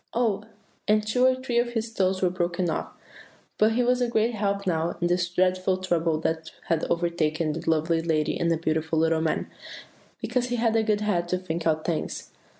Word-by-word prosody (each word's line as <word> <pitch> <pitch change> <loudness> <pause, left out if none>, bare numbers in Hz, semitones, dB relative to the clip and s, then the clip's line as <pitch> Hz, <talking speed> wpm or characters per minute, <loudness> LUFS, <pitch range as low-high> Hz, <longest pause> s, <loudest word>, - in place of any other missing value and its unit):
Oh! 225 -4 +1 0.5
and 215 0 +3
two 250 +4 +3
or 260 - +3
three 255 -2 -1
of 240 0 -1
his 225 0 -3
toes 190 -2 +1
were 180 - +3
broken 175 -1 -1
off; - - -3 0.7
but 215 +1 +4
he 245 +2 +2
was 250 +1 +2
a 245 - +2
great 230 +1 +1
help 200 -1 -1
now 165 -2 0
in 175 - 0
this 175 0 +1
dreadful 185 +1 +1
trouble 170 -4 0
that 160 0 -2 0.2
had 165 -2 +1
overtaken 165 -2 0
the 165 +1 -3
lovely 165 +1 +2
lady 155 -2 0
and 170 - +1
the 165 - +2
beautiful 160 0 -1
little 160 0 +2
man, 160 -1 0 0.7
because 245 0 -1
he 245 - -1
had 230 -1 +1
a 225 - +4
good 215 -1 +1
head 180 -5 0
to 180 - 0
think 170 -2 -3
out 155 -1 +1
things." 165 -3 -3
180 Hz, 205 wpm, -26 LUFS, 165-220 Hz, 0.7 s, but